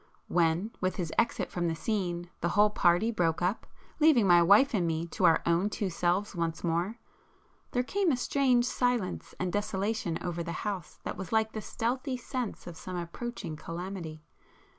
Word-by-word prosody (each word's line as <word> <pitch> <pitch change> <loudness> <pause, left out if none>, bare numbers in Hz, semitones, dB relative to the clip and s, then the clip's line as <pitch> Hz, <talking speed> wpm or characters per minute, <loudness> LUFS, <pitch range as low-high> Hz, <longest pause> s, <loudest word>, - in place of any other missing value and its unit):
When, 170 +5 +2
with 185 -1 0
his 170 -4 -3
exit 230 - 0
from 175 -1 -1
the 165 - -1
scene, 175 -3 -2
the 170 - 0
whole 210 +2 +4
party 180 +4 +3
broke 170 -5 0
up, 185 +5 -1 0.3
leaving 300 -8 +5
my 175 -2 +7
wife 205 +11 +6
and 180 -6 +1
me 165 0 -1
to - - 0
our 165 - +5
own 170 +4 +2
two 200 -2 -2
selves 180 +5 0
once 165 -2 -2
more, 175 +6 0 0.7
there 245 - 0
came 385 +5 +1
a 255 - +1
strange 250 -1 +2
silence 245 -5 -1
and 185 -1 -2
desolation 205 -3 -1
over 175 -1 -3
the 170 0 -4
house 190 -6 -4
that - - -4
was 190 -1 -6
like 220 0 +2
the 215 - -5
stealthy 255 +5 -2
sense 250 -2 -4
of 175 -2 -8
some 185 - -6
approaching 175 0 -5
calamity. 165 -1 -6
185 Hz, 180 wpm, -30 LUFS, 170-225 Hz, 0.7 s, my